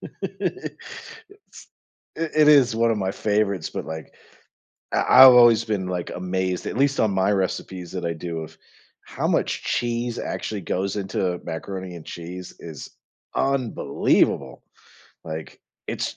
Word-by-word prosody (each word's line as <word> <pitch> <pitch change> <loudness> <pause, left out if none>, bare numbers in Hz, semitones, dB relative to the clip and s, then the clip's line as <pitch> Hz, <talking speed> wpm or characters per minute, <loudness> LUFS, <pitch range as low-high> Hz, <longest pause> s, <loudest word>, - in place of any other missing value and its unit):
It's 445 -3 -8 0.5
I - - -7
It 155 -2 +3
is 130 -6 +6
one 115 0 +3
of 105 - -2
my 95 -1 -1
favorites, 100 -4 0
but, - - -5
like, 80 -1 -8 0.8
I - - +2 0.2
I've 130 -1 +11
always 120 -2 +7
been, 100 -4 -2
like, 90 -1 -3
amazed- 90 0 -2
at - - -4
least 140 +1 +2
on 110 -2 +2
my 95 +1 +2
recipes 95 -2 -2
that 90 - -4
I 85 0 -1
do- 85 0 -5
of 80 0 -10 0.4
how - - -3
much - - 0
cheese 120 0 -1
actually 105 -3 -4
goes 95 +4 -2
into 95 -2 -2
macaroni 95 +2 -6
and 85 -2 -10
cheese 90 +2 -8
is 80 -4 -9 0.5
unbelievable, 135 -4 +1 0.6
like, 80 -1 -7 0.3
it's - - -3
95 Hz, 140 wpm, -23 LUFS, 90-120 Hz, 0.8 s, I've